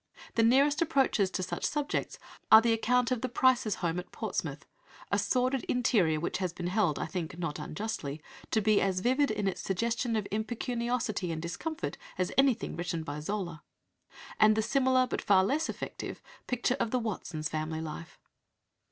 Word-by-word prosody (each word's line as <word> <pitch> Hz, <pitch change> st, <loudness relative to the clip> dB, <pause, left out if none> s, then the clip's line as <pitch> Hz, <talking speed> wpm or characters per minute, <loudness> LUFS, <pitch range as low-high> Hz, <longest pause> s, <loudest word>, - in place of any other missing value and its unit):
The 230 Hz, -, +2 dB
nearest 275 Hz, +6 st, +4 dB
approaches 270 Hz, -, +2 dB
to 185 Hz, -, -3 dB
such 180 Hz, -, -4 dB
subjects 295 Hz, -2 st, -1 dB, 0.3 s
are 220 Hz, -, +12 dB
the 230 Hz, 0 st, +2 dB
account 245 Hz, +2 st, +2 dB
of 250 Hz, -3 st, 0 dB
the 255 Hz, -, -2 dB
Prices' 245 Hz, -3 st, +3 dB
home 170 Hz, +1 st, 0 dB
at 180 Hz, -, -9 dB
Portsmouth -, -, -4 dB, 0.5 s
(a -, -, +3 dB
sordid 255 Hz, +1 st, +1 dB
interior 195 Hz, -11 st, +2 dB
which 170 Hz, -, -2 dB
has 185 Hz, -3 st, -2 dB
been 175 Hz, 0 st, -6 dB
held, 180 Hz, -4 st, +1 dB
I -, -, -2 dB
think 165 Hz, -1 st, -5 dB
not 165 Hz, -4 st, -3 dB
unjustly, 155 Hz, -6 st, -4 dB, 0.3 s
to 220 Hz, -, +2 dB
be 215 Hz, 0 st, +3 dB
as 190 Hz, -1 st, 0 dB
vivid 260 Hz, +6 st, +2 dB
in 210 Hz, -2 st, -1 dB
its 190 Hz, -, -2 dB
suggestion 230 Hz, +5 st, -1 dB
of 210 Hz, -2 st, -1 dB
impecuniosity 235 Hz, -2 st, -2 dB
and 160 Hz, -, -3 dB
discomfort 310 Hz, -, -4 dB, 0.2 s
as 185 Hz, -1 st, 0 dB
anything 270 Hz, -4 st, +2 dB
written 170 Hz, -1 st, -3 dB
by 145 Hz, -1 st, -5 dB
Zola), 170 Hz, -2 st, -4 dB, 0.8 s
and 215 Hz, 0 st, +6 dB
the 220 Hz, -, +1 dB
similar, 260 Hz, 0 st, +3 dB
but 250 Hz, -, -3 dB
far 190 Hz, -2 st, +4 dB
less 295 Hz, +10 st, 0 dB
effective, -, -, -5 dB, 0.3 s
picture 250 Hz, +1 st, 0 dB
of -, -, 0 dB
the 255 Hz, -, +1 dB
Watsons' 180 Hz, -9 st, -3 dB
family 155 Hz, +1 st, -3 dB
life. 160 Hz, +1 st, -7 dB
215 Hz, 175 wpm, -30 LUFS, 175-250 Hz, 0.8 s, are